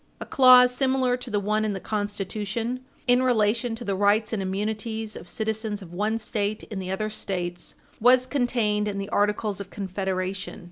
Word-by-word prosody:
A - - -6
clause 250 -1 +7
similar 260 -1 +1
to 250 0 -8
the 205 -2 0
one 215 +2 0
in 215 -1 0
the 190 - -4
Constitution 210 +4 -3 0.3
in 245 0 +4
relation 230 -1 +2
to 235 +1 -8
the 200 - 0
rights 205 +3 +2
and 210 - -1
immunities 215 +3 -3
of - - -9
citizens 220 0 -3
of 175 -1 -12
one 210 +4 0
State 215 -1 -2
in 205 - -3
the 185 -1 -5
other 215 +3 -2
States 180 -4 -4 0.2
was 250 +2 +5
contained 235 -6 0
in 200 -1 -3
the 200 +1 -4
Articles 210 0 0
of 195 - -8
Confederation. 190 0 -3
215 Hz, 180 wpm, -25 LUFS, 200-230 Hz, 0.3 s, clause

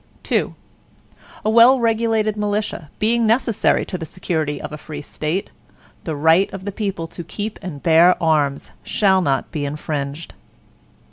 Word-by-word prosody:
II - - +1 0.9
A - - +2
well 235 +4 +7
regulated 225 -2 +1
militia, 205 -6 -2
being 230 +1 +2
necessary 230 -1 +2
to 185 - -5
the 165 - -5
security 155 -5 -2
of - - -7
a 150 - -6
free 150 -1 -8
State, 155 +6 -3 0.5
the 160 - -3
right 160 +6 +3
of 195 -1 -8
the 200 - -3
people 195 -5 -3
to 170 +1 -8
keep 210 +5 -6
and 150 -6 -7
bear 170 +2 +6
arms, 150 -4 +1
shall 190 -2 +2
not 135 -5 -1
be 150 -4 -3
infringed. 145 +1 -4
180 Hz, 150 wpm, -20 LUFS, 155-215 Hz, 0.9 s, well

